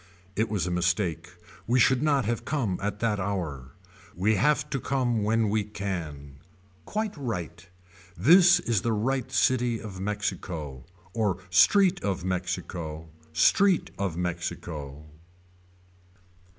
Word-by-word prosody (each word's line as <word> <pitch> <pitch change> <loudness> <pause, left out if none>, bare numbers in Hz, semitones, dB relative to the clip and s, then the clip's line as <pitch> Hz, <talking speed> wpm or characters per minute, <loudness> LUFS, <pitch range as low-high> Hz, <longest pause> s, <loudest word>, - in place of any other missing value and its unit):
It 110 +2 0
was 100 -5 -1
a 90 - -2
mistake 90 -1 0 0.4
we 125 +2 +3
should 130 +1 +4
not 145 -5 +2
have 115 +1 -1
come 120 -11 -1
at 105 +1 -3
that 110 -3 +1
hour. 80 -10 -4 0.4
We 100 +5 +2
have 150 +8 +2
to 135 - -1
come 125 -4 0
when 110 +1 +2
we 105 +1 +1
can. 85 -9 -6 0.5
Quite 215 -1 -3
right. 90 - -5 0.5
This 175 +3 +7
is 115 -5 0
the 115 +2 0
right 130 +4 -1
city 120 -2 +2
of 100 -4 -8
Mexico. 90 -9 -4 0.3
Or 105 -6 0
street 180 - +5
of 95 -3 -2
Mexico. 85 -3 -4 0.2
Street 185 - +3
of 95 -4 -2
Mexico. 80 -4 -5
105 Hz, 125 wpm, -27 LUFS, 85-120 Hz, 0.5 s, This